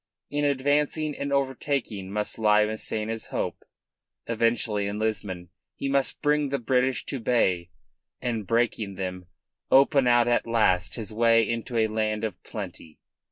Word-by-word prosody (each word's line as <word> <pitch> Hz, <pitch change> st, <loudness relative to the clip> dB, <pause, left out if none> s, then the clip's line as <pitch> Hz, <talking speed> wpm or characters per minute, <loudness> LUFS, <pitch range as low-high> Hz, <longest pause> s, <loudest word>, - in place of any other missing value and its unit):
In 145 Hz, 0 st, 0 dB
advancing 145 Hz, +2 st, +1 dB
and 140 Hz, 0 st, -4 dB
overtaking 135 Hz, -7 st, -1 dB
must 105 Hz, +2 st, -2 dB
lie 105 Hz, -1 st, +4 dB
Massena's 110 Hz, +1 st, -3 dB
hope. -, -, -3 dB, 0.6 s
Eventually 115 Hz, -3 st, 0 dB
in 100 Hz, +1 st, -3 dB
Lisbon 100 Hz, -5 st, -3 dB, 0.3 s
he 140 Hz, -, -3 dB
must 135 Hz, -1 st, 0 dB
bring 150 Hz, -1 st, +2 dB
the 140 Hz, -, 0 dB
British 130 Hz, +1 st, +1 dB
to 135 Hz, -, -4 dB
bay, 95 Hz, -8 st, +1 dB, 0.5 s
and, 115 Hz, -5 st, -3 dB
breaking 115 Hz, -3 st, 0 dB
them, 90 Hz, -1 st, -5 dB, 0.4 s
open 135 Hz, -1 st, +5 dB
out 120 Hz, -1 st, +5 dB
at 120 Hz, -1 st, +1 dB
last 100 Hz, -6 st, +2 dB
his 110 Hz, -3 st, -5 dB
way 115 Hz, 0 st, +4 dB
into 115 Hz, +1 st, -3 dB
a 110 Hz, -, +4 dB
land 110 Hz, 0 st, -1 dB
of 110 Hz, -5 st, -4 dB
plenty. 80 Hz, -2 st, -8 dB
115 Hz, 145 wpm, -26 LUFS, 105-135 Hz, 0.6 s, open